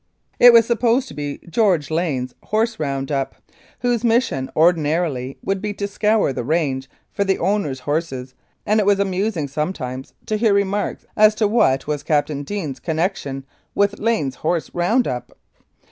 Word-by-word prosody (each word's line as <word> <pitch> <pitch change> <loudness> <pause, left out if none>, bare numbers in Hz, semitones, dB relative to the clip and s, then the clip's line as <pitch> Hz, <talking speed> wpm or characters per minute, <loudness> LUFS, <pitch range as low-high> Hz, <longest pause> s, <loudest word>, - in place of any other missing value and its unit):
It 245 0 +10
was 230 -1 +6
supposed 240 +3 +1
to - - -9
be 145 -1 -5
George 170 -5 +1
Lane's 145 -7 -1
horse 225 +2 0
round 135 -2 -2
up, 135 -1 -1 0.5
whose 245 -1 0
mission 225 - +1
ordinarily 155 -5 +1
would 195 -1 -1
be 210 -1 -3
to 200 - -3
scour 210 -5 +1
the 125 - -3
range 135 -2 -1 0.2
for 200 - 0
the 195 -1 +1
owner's 170 -8 -1
horses, 140 -4 -3 0.3
and 215 +1 +3
it 210 - +2
was 200 -1 +4
amusing 190 -4 -1
sometimes 135 -3 -4
to 215 - -1
hear 215 -2 +3
remarks 200 0 -1
as 215 0 +5
to 215 -1 +2
what 135 - +2
was 150 -1 -2
Captain 145 -1 0
Deane's 145 -5 -4
connection 155 -3 -2 0.3
with 200 0 +1
Lane's 210 - 0
horse 165 +1 -1
round 220 +9 +2
up 125 -1 -5
175 Hz, 160 wpm, -21 LUFS, 140-210 Hz, 0.5 s, It